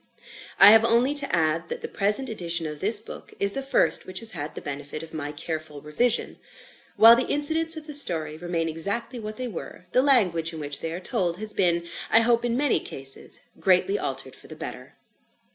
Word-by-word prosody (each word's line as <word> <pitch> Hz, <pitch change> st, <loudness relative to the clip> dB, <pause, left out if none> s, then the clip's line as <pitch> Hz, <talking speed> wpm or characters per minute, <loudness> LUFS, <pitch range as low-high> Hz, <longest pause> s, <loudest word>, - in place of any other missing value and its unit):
I 200 Hz, +1 st, +9 dB
have 225 Hz, 0 st, +6 dB
only 235 Hz, +4 st, +2 dB
to 285 Hz, -1 st, +4 dB
add, 165 Hz, 0 st, 0 dB
that -, -, -5 dB
the -, -, -5 dB
present 210 Hz, +7 st, +2 dB
edition 170 Hz, -6 st, -2 dB
of 150 Hz, -1 st, -7 dB
this 210 Hz, +2 st, +3 dB
book 220 Hz, -, -12 dB
is 200 Hz, 0 st, +4 dB
the 275 Hz, -, -3 dB
first 270 Hz, -, +1 dB
which 185 Hz, 0 st, -8 dB
has 225 Hz, -1 st, -2 dB
had 155 Hz, -5 st, -6 dB
the -, -, -5 dB
benefit 145 Hz, +2 st, -6 dB
of 165 Hz, -, -12 dB
my 145 Hz, -2 st, -5 dB
careful 155 Hz, -1 st, -7 dB
revision. 215 Hz, -, -2 dB, 0.6 s
While 230 Hz, +1 st, +8 dB
the 250 Hz, -, -1 dB
incidents 320 Hz, +3 st, +2 dB
of 310 Hz, -, -9 dB
the 300 Hz, -, -8 dB
story 160 Hz, -, +1 dB
remain 165 Hz, 0 st, -3 dB
exactly 200 Hz, +10 st, -1 dB
what 215 Hz, -1 st, -7 dB
they 255 Hz, +2 st, -5 dB
were, 180 Hz, -3 st, -9 dB
the 255 Hz, -, +3 dB
language 180 Hz, -, +2 dB
in 160 Hz, -, -8 dB
which 145 Hz, -1 st, -5 dB
they 165 Hz, -, -5 dB
are 170 Hz, -, -6 dB
told 180 Hz, -4 st, -2 dB
has 215 Hz, +1 st, -4 dB
been, 170 Hz, -3 st, 0 dB, 0.2 s
I 225 Hz, -, +5 dB
hope, 235 Hz, 0 st, +1 dB
in 240 Hz, 0 st, -1 dB
many 290 Hz, 0 st, +1 dB
cases 135 Hz, 0 st, -3 dB, 0.2 s
greatly 195 Hz, -, +1 dB
altered -, -, -6 dB
for -, -, -16 dB
the -, -, -11 dB
better. -, -, -8 dB
195 Hz, 210 wpm, -24 LUFS, 160-240 Hz, 0.6 s, I